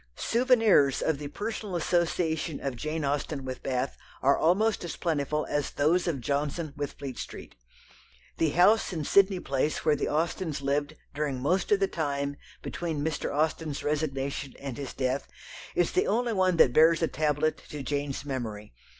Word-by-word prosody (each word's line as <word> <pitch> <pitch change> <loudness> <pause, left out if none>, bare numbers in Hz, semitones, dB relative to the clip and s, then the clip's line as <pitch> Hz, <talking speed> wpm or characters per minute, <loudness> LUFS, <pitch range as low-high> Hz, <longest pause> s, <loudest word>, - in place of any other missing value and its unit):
Souvenirs 225 - +3
of 160 -3 0
the 145 - -5
personal 210 +4 -4
association 165 -2 0
of 135 -2 -3
Jane 155 +4 -3
Austen 140 0 -2
with 130 -1 -5
Bath 130 0 -2 0.2
are 140 +2 +5
almost 205 +7 +2
as 170 - -4
plentiful 150 -2 -1
as 145 -1 -1
those 165 +6 +2
of 145 -7 -1
Johnson 145 +4 -2
with 145 -1 -4
Fleet 135 -4 -7
Street. - - -8 0.8
The 160 - +2
house 185 +9 +4
in 160 -4 -3
Sydney 195 +3 +4
Place 140 0 -1
where 155 - +4
the - - -2
Austens 160 0 -1
lived 145 +2 -1 0.2
during 145 -3 -2
most 180 - 0
of 415 - +5
the 390 - +2
time 145 - -2 0.3
between 160 -4 -3
Mr. 160 -2 -2
Austen's 155 0 -1
resignation 140 -2 -2
and 135 -3 -6
his 140 -1 -6
death 130 +1 -1 0.5
is - - +2
the 380 +3 +1
only 235 0 +1
one 185 -3 +2
that 125 - +6
bears 160 +2 +5
a - - +3
tablet 155 0 0
to 150 -2 -6
Jane's 140 0 -3
memory. 110 - -5
150 Hz, 165 wpm, -28 LUFS, 140-170 Hz, 0.8 s, that